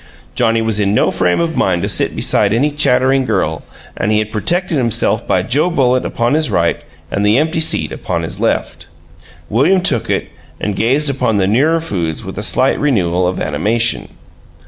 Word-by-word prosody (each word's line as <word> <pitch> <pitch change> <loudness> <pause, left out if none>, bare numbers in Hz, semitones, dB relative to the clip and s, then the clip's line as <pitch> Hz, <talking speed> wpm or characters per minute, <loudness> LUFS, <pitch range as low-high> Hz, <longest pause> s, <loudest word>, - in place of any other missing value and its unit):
Johnnie 115 -2 +1
was 110 -2 -1
in 100 0 +1
no - - +2
frame 90 -1 +1
of 165 -1 -1
mind 90 -2 0
to - - 0
sit - - 0
beside 100 -1 +1
any 140 +6 +1
"chattering 135 -2 +2
girl," 95 -9 -1 0.3
and 105 - -1
he 105 - +2
had 110 0 -2
protected 170 - -1
himself 115 -2 0
by - - +1
Joe 145 +8 +1
Bullitt 130 -6 +1
upon 120 +3 -1
his 155 0 +1
right 85 -1 0 0.3
and 100 - -1
the 105 +3 +3
empty 160 +3 0
seat 80 - +1
upon - - -3
his - - -6
left. - - -2 0.6
William 150 - +2
took 140 - -1
it, - - -1 0.3
and 105 -2 -2
gazed 135 +8 +1
upon 125 -5 0
the 95 - +2
nearer 140 +11 +2
foods 85 - -3
with - - -6
a - - -3
slight - - +1
renewal 90 -11 +1
of 90 - -2
animation. 110 +10 -1
115 Hz, 190 wpm, -15 LUFS, 100-145 Hz, 0.6 s, the